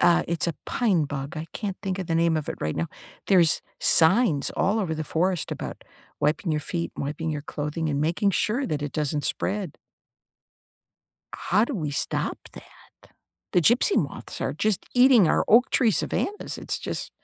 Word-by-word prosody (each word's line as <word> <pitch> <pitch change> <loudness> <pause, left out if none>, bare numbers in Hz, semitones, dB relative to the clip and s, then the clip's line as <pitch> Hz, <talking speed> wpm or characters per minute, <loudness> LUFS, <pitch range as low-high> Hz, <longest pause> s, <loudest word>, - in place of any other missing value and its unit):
Uh, 175 - +5
it's 170 0 0
a 170 - -1
pine 195 -10 +1
bug. 140 +2 -5
I 155 - -5
can't 200 -4 -4
think 190 -1 -3
of 185 - -4
the 165 - -1
name 165 -1 +2
of 150 - -6
it - - -2
right 75 0 -2
now. 80 +1 -1 0.4
There's 175 -5 +4 0.2
signs 165 - +4
all 205 +4 +1
over 170 -6 -2
the 155 0 -4
forest 175 +2 -1
about - - -7 0.4
wiping 150 +4 0
your 150 - 0
feet, 170 +2 -3
wiping 150 +3 -3
your 150 -2 -4
clothing, 150 +2 -3
and 140 -1 -1
making 170 +6 +1
sure 235 +8 0
that 150 -9 -2
it 145 - -4
doesn't 150 -1 -1
spread. 195 -5 -2 1.6
How 210 +5 +2
do 270 - -5
we 155 -8 -3
stop 140 - -1 0.2
that? - - -17 0.4
The 180 - +4
gypsy 235 - +4
moths - - -3
are - - -1
just 215 -3 0
eating 250 -5 +6
our - - +2
oak 245 +4 +5
tree 235 -4 +3
savannahs. 415 - -2
It's - - -3
just - - -4
170 Hz, 180 wpm, -25 LUFS, 150-205 Hz, 1.6 s, eating